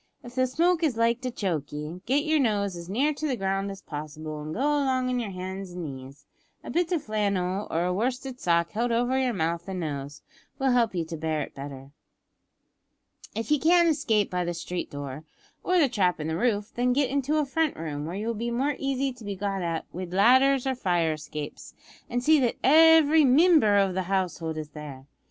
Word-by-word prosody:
If 240 - -10
the 255 0 +2
smoke 335 +6 +2
is 290 -8 +1
like 230 +1 +2
to 255 - -2
choke 175 - -3
ye, 150 +4 -6
git 280 +4 +2
yer 310 0 +2
nose 205 -7 0
as 170 0 -9
near 275 +10 +1
the 290 -2 -2
ground 195 -1 -1
as 195 0 -9
possible, 155 0 -6
an' 155 +1 -6
go 185 - -5
along 270 -3 +1
on 250 -1 0
yer 230 -4 -3
hands 190 0 -6
and 180 -1 -5
knees. 140 0 -9 0.4
A - - -7
bit 350 +1 0
o' 350 - +3
flannel 200 - -1
or 165 +2 0
a 180 - 0
worsted 250 +5 -2
sock 170 -1 +1
held 235 +3 -1
over 245 +2 +1
yer 260 -2 +1
mouth 170 -2 -2
an' 190 - -4
nose, 145 -2 -5 0.3
will 270 -2 +1
help 235 -5 +2
you 170 -2 -1
to 165 - -6
bear 155 -1 -1
it - - -10
better. 135 -1 -9 1.4
"If 225 +6 -3
ye 300 - +4
can't 340 +2 +5
escape 225 -10 +1
by 180 0 0
the 175 0 -3
street 175 +2 -4
door, 145 +1 -7 0.4
or 365 - +2
the 315 -5 +5
trap 195 -9 +1
in 150 - -3
the 160 - -1
roof, 205 +1 0
then 245 +1 +1
get 275 0 +1
into 280 +2 0
a 300 - +2
front 310 +2 0
room, 150 -2 -4
where 170 - -5
you 205 +2 -4
will 230 - -1
be 230 +2 -3
more 270 +5 0
easy 275 -1 -1
to 245 -2 -14
be 200 -1 -4
got 195 0 -2
at 165 -2 -2
wid 180 0 -6
ladders 260 +6 +5
or 265 - +1
fire 175 -9 +1
escapes, 150 -1 -8 0.3
an' 245 +1 -1
see 310 +4 +5
that 245 -3 +1
every 320 +1 +6
mimber 280 - +5
o' 195 -2 +2
the 190 - -1
household 175 -4 -1
is 155 -1 -5
there. 145 -3 -9
205 Hz, 215 wpm, -26 LUFS, 170-265 Hz, 1.4 s, every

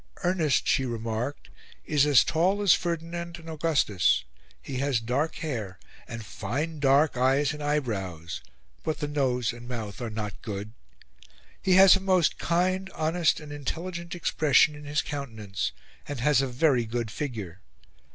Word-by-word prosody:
"Ernest," 165 -7 +2
she 135 - +3
remarked, 115 +2 -4 0.3
"is 150 -1 +3
as 140 -3 +6
tall 185 +6 +1
as 195 - +7
Ferdinand 170 0 -3
and 165 -1 -13
Augustus; 145 - +2 0.4
he 130 - -6
has 140 -3 +1
dark 130 +8 -1
hair, 115 - -4 0.3
and 115 -2 -7
fine 145 +12 -3
dark 140 +1 +4
eyes 135 +3 +2
and 150 - -8
eyebrows, 100 - -2 0.4
but 155 - -2
the 150 - -3
nose 125 -5 0
and 120 0 -11
mouth 110 -5 -5
are 120 - -3
not 105 -2 -5
good; 105 +1 -6 0.9
he 190 - +3
has 190 +1 +9
a - - -1
most 185 -3 +2
kind, 185 +2 0
honest, 160 +1 +1
and 150 -2 -10
intelligent 170 +5 -5
expression 155 -3 +3
in 150 0 -11
his 145 +1 0
countenance, 110 - -4 0.4
and 145 -3 -4
has 140 +1 +3
a 135 - 0
very 125 -1 +2
good 115 -1 -3
figure. 105 - -5
140 Hz, 150 wpm, -27 LUFS, 115-160 Hz, 0.9 s, has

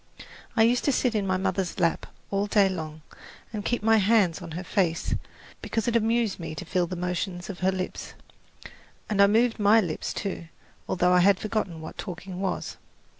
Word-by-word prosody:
I 225 - +5
used 240 +2 +3
to 285 - +4
sit 250 -2 +1
in 205 -3 0
my 185 0 +1
mother's 190 -1 -2
lap 170 -1 +1 0.2
all 200 +1 0
day 205 -1 +4
long 155 -4 -5 0.5
and 210 -1 -3
keep 240 0 -1
my 225 0 +5
hands 200 -5 +3
on 165 -2 -8
her 180 +3 -4
face 180 -4 0 0.5
because 225 0 -2
it 235 - +1
amused 230 -2 +1
me 160 -2 -6
to - - -6
feel 180 0 0
the 185 - -5
motions 180 +1 -3
of 180 - -11
her 190 +1 +2
lips; 185 -1 -5 1.0
and 200 -1 +3
I 200 - +8
moved 225 +3 +2
my 210 +2 +6
lips, 175 -7 -2
too, 195 -4 -4 0.4
although 180 0 +3
I 180 - +6
had 195 +2 +5
forgotten 200 -6 -2
what 160 - -9
talking 180 0 -6
was. 190 -2 -3
190 Hz, 190 wpm, -26 LUFS, 180-215 Hz, 1.0 s, I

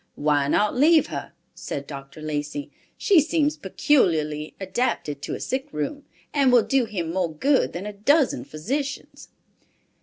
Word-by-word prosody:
"Why 145 -1 +1
not 210 +9 +2
leave 310 +5 +5
her?" - - -5 0.2
said 140 - -6
Dr. 140 +1 -9
Lacey. 145 -1 -4 0.3
"She 380 -6 +5
seems 305 -1 +1
peculiarly 160 - +1
adapted 190 - -2
to - - -4
a - - -7
sick 260 +1 -3
room, 155 - -4 0.3
and 275 -3 +4
will 245 -2 +6
do 270 -3 +2
him 170 -7 -4
more 180 -3 0
good 270 - +2
than 180 +3 -5
a 210 - -5
dozen 275 +8 +2
physicians." 270 - -5
195 Hz, 150 wpm, -24 LUFS, -, 0.3 s, will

